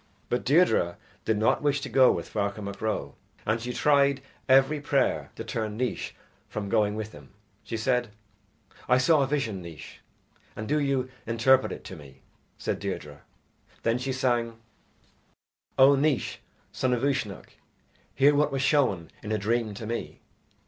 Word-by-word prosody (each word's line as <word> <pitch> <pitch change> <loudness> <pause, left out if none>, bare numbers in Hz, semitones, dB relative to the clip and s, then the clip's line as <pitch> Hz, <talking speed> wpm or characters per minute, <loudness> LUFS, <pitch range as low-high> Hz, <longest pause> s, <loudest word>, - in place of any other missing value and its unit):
But 120 - 0
Deirdre 140 - +3 0.3
did 110 - +1
not 110 +1 +2
wish 145 -1 +1
to - - -4
go 130 -1 +5
with - - -3
Ferchar 100 0 -2
Mac 100 0 -7
Ro, 110 -1 -2 0.3
and 110 +1 0
she 125 +1 -3
tried 140 0 +3 0.3
every 135 +3 +5
prayer 140 -2 +1
to - - -6
turn 110 -1 -3
Naois 125 +1 -2 0.4
from 100 -2 -4
going 105 -2 +2
with 110 0 -5
him 75 -2 -14 0.3
she 115 - -4
said: 120 +1 +1 0.8
"I 125 - +6
saw 150 +4 +4
a 135 - +2
vision, 125 -9 -1
Naois, 85 -5 -10 0.6
and 110 - -5
do 150 +2 +2
you 135 -3 0 0.2
interpret 120 +3 +3
it - - -7
to 95 - -8
me," 70 -4 -14 0.3
said - - -2
Deirdre 75 -1 -5 0.6
then 115 +2 +1
she 130 +1 -2
sang: 120 -3 0 1.2
O 135 +1 +8
Naois, 140 -1 0 0.3
son 125 +4 0
of 125 +1 -1
Uisnech, 135 -8 -2 0.6
hear 140 +2 +5
What 145 +1 +2
was 135 0 -1
shown 120 - +2
in 110 - -6
a 110 - +2
dream 110 +1 -1
to 110 - -7
me. 115 +2 -4
120 Hz, 165 wpm, -27 LUFS, 105-135 Hz, 1.2 s, O